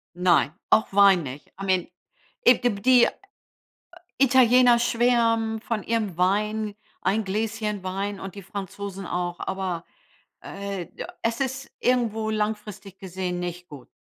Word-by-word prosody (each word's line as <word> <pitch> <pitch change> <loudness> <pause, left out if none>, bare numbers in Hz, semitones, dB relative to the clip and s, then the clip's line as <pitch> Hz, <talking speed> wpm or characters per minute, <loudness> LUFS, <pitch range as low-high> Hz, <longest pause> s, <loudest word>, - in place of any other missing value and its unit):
Nein, 175 -4 +3 0.2
auch 220 - +4
Wein 195 -4 +6
nicht. 135 +2 -8
I - - -3
mean 185 -2 +1 0.6
it 245 0 +5
die 245 - +3
die 250 -1 +6 1.1
Italiener 250 -2 +5
schwärmen 230 -2 +2
von 220 -3 -3
ihrem 215 -6 -2
Wein, 210 +3 0 0.3
ein 205 +3 +1
Gläschen 210 0 -2
Wein, 195 +2 -3
und 195 -1 -7
die 200 - -8
Franzosen 195 0 -6
auch. 175 0 -3
Aber, 185 -3 -3 0.6
äh, 195 -3 -6
da - - -6
es 230 +2 -1
ist 265 0 -3
irgendwo 225 -3 +1
langfristig 210 -2 -4
gesehen 185 -1 -4
nicht 180 0 -5
gut. 140 -5 -12
205 Hz, 135 wpm, -25 LUFS, 185-230 Hz, 1.1 s, Wein